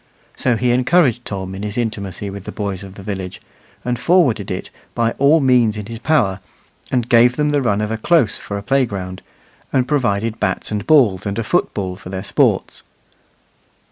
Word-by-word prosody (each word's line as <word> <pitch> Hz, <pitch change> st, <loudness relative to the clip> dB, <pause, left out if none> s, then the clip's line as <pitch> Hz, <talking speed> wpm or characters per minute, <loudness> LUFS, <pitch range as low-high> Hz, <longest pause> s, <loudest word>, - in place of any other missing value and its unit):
So 125 Hz, -, +1 dB
he 125 Hz, +1 st, +1 dB
encouraged 125 Hz, -1 st, +2 dB
Tom 95 Hz, -2 st, -5 dB
in 95 Hz, -, -6 dB
his 105 Hz, +1 st, -4 dB
intimacy 100 Hz, -4 st, -3 dB
with 100 Hz, -1 st, -8 dB
the -, -, -5 dB
boys 100 Hz, -2 st, -4 dB
of 95 Hz, -1 st, -11 dB
the 100 Hz, -, -10 dB
village, 95 Hz, -2 st, -5 dB, 0.5 s
and 120 Hz, -1 st, -1 dB
forwarded 130 Hz, -, +2 dB
it -, -, -5 dB, 0.2 s
by 115 Hz, -1 st, +1 dB
all 145 Hz, +4 st, +5 dB
means 125 Hz, -6 st, +3 dB
in 105 Hz, -, -5 dB
his 115 Hz, +1 st, -7 dB
power, 115 Hz, -10 st, +1 dB, 0.5 s
and 125 Hz, -3 st, 0 dB
gave 120 Hz, +1 st, +5 dB
them 150 Hz, +1 st, +1 dB
the 145 Hz, -1 st, +2 dB
run 105 Hz, -5 st, +1 dB
of 105 Hz, 0 st, -2 dB
a 110 Hz, -, -2 dB
close 135 Hz, -5 st, +3 dB
for 100 Hz, -, -6 dB
a 100 Hz, -, -6 dB
playground, 100 Hz, -8 st, -1 dB, 0.5 s
and 130 Hz, -2 st, +1 dB
provided 115 Hz, -5 st, 0 dB
bats 100 Hz, -1 st, -1 dB
and 105 Hz, 0 st, -3 dB
balls 115 Hz, -, +4 dB
and 100 Hz, +1 st, -3 dB
a 115 Hz, -, -1 dB
football 95 Hz, -3 st, -1 dB
for 95 Hz, -2 st, -10 dB
their 95 Hz, 0 st, -5 dB
sports. -, -, +1 dB
110 Hz, 190 wpm, -19 LUFS, 100-125 Hz, 0.5 s, all